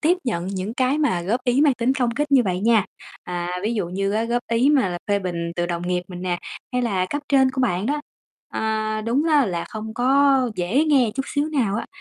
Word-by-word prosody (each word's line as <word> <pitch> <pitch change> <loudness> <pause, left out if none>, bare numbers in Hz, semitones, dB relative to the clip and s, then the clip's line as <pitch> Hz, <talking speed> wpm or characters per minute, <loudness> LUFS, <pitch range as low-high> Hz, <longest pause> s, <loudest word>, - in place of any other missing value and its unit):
tiếp 340 +4 +3
nhận 180 -8 -2
những 195 +3 -4
cái 260 +3 +1
mà 235 - +1
góp 225 +8 0
ý 250 +1 +2
mang 290 -3 +4
tính 240 +2 +1
công 245 -3 +1
kích 290 +4 -2
như 265 - +6
vậy 185 -2 -1
nha, 220 -1 +3 0.4
à, 175 0 -3
ví 220 +3 -1
dụ 200 -6 -2
như 195 +2 -1
á 220 +2 0
góp 240 +1 -1
ý 235 +5 +3
mà 270 -9 +3
là 175 -1 -4
phê 205 0 +2
bình 170 -3 -3
từ 175 0 0
đồng 175 -1 -3
nghiệp 180 0 0
mình 180 -1 -8
nè 180 -1 -1 0.3
hay 250 0 0
là 195 -6 0
cấp 290 0 -2
trên 265 -2 +4
của 260 0 -3
bạn 195 -4 0
đó. 295 +3 0 0.5
À, 215 0 -1
đúng 235 +7 0
á 290 -4 +4
là 175 -3 -2
không 220 0 -7
có 270 +3 +4
dễ 205 - +1
nghe 270 -7 +3
chút 270 - -1
xíu 290 +2 -1
nào 250 -10 0
á, 230 - -4
230 Hz, 245 wpm, -22 LUFS, 185-265 Hz, 0.5 s, như